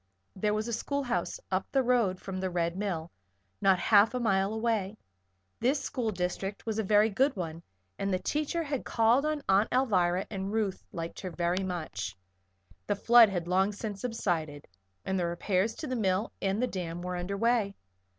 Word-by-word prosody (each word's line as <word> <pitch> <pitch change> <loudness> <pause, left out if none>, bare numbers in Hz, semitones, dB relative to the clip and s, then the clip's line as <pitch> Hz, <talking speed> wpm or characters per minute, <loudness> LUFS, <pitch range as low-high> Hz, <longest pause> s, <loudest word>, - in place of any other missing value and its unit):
There 210 +2 0
was 215 +2 -2
a 235 - -3
schoolhouse 270 - -2
up - - 0
the 270 -1 +3
road 235 -7 +2
from 190 -1 -5
the 190 0 -1
Red 170 -1 -1
Mill 175 -5 -3 0.5
not 195 -1 +5
half 210 +4 +4
a - - 0
mile 195 -4 +2
away; 220 -2 -1 0.6
this 270 +5 0 0.2
district 185 +2 -3
school - - -43
was 220 0 -1
a - - +1
very 210 +2 +4
good 265 +8 +2
one 165 -3 -5 0.4
and 195 0 -1
the 185 - +2
teacher 305 - -1
had 285 -4 -3
called 235 +6 +3
on 305 -1 -2
Aunt 195 +3 +4
Alvirah 190 -8 +2
and 195 -1 -3
Ruth 210 -3 -1
liked 165 -3 -5
her 185 - -4
very 175 +2 -1
much. 105 - -4 0.7
The 205 - +1
flood 235 +2 +7
had 175 -3 -3
long 190 +3 +2
since 205 -1 -5
subsided 165 -11 -2 0.4
and 190 0 0
the 175 - 0
repairs 185 +5 0
to - - -6
the 255 - -2
mill 200 -1 0
and 195 +1 0
the 250 - +2
dam 175 -6 -5
were 180 0 -3
under 180 +3 -3
way. 230 -3 +1
200 Hz, 185 wpm, -30 LUFS, 180-230 Hz, 0.7 s, flood